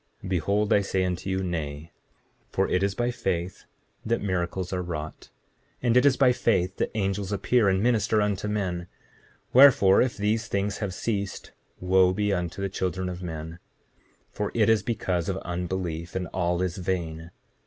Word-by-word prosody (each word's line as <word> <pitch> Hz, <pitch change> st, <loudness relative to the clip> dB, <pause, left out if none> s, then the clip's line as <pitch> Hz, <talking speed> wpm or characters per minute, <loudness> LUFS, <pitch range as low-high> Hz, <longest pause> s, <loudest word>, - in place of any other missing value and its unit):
7:37 -, -, -6 dB
Behold 100 Hz, +5 st, +1 dB
I 100 Hz, -, +4 dB
say 95 Hz, -1 st, 0 dB
unto 90 Hz, +1 st, -3 dB
you, 95 Hz, 0 st, -1 dB
Nay; 80 Hz, -3 st, -4 dB, 0.6 s
for -, -, 0 dB
it 90 Hz, -, +1 dB
is 100 Hz, 0 st, 0 dB
by 120 Hz, 0 st, 0 dB
faith 90 Hz, -6 st, -3 dB, 0.4 s
that 115 Hz, +1 st, 0 dB
miracles 95 Hz, -1 st, -2 dB
are 90 Hz, -, -1 dB
wrought; 80 Hz, -3 st, -6 dB, 0.5 s
and 120 Hz, -1 st, +2 dB
it 125 Hz, +3 st, +6 dB
is 130 Hz, -, +3 dB
by 130 Hz, -3 st, +5 dB
faith 95 Hz, -6 st, +1 dB
that -, -, 0 dB
angels 100 Hz, -1 st, -1 dB
appear 105 Hz, +1 st, +2 dB
and 95 Hz, +1 st, +1 dB
minister 110 Hz, -2 st, +2 dB
unto 105 Hz, -1 st, 0 dB
men; 90 Hz, -4 st, -2 dB, 0.7 s
wherefore, 125 Hz, -8 st, +7 dB
if 125 Hz, -1 st, 0 dB
these 110 Hz, +3 st, 0 dB
things 100 Hz, -2 st, -1 dB
have 100 Hz, -4 st, -3 dB
ceased 100 Hz, -3 st, -3 dB, 0.3 s
wo 90 Hz, 0 st, +4 dB
be 105 Hz, +1 st, 0 dB
unto 90 Hz, +1 st, -3 dB
the -, -, +1 dB
children 95 Hz, 0 st, -2 dB
of 90 Hz, 0 st, -6 dB
men, 80 Hz, -1 st, -6 dB, 0.7 s
for 105 Hz, -1 st, -3 dB
it 110 Hz, -2 st, +3 dB
is 110 Hz, -3 st, +4 dB
because 95 Hz, -5 st, -2 dB
of 95 Hz, -, -1 dB
unbelief, 85 Hz, -1 st, -4 dB
and 95 Hz, -1 st, -1 dB
all 90 Hz, -1 st, 0 dB
is 90 Hz, -1 st, -2 dB
vain. 85 Hz, -3 st, -3 dB
95 Hz, 175 wpm, -26 LUFS, 90-105 Hz, 0.7 s, wherefore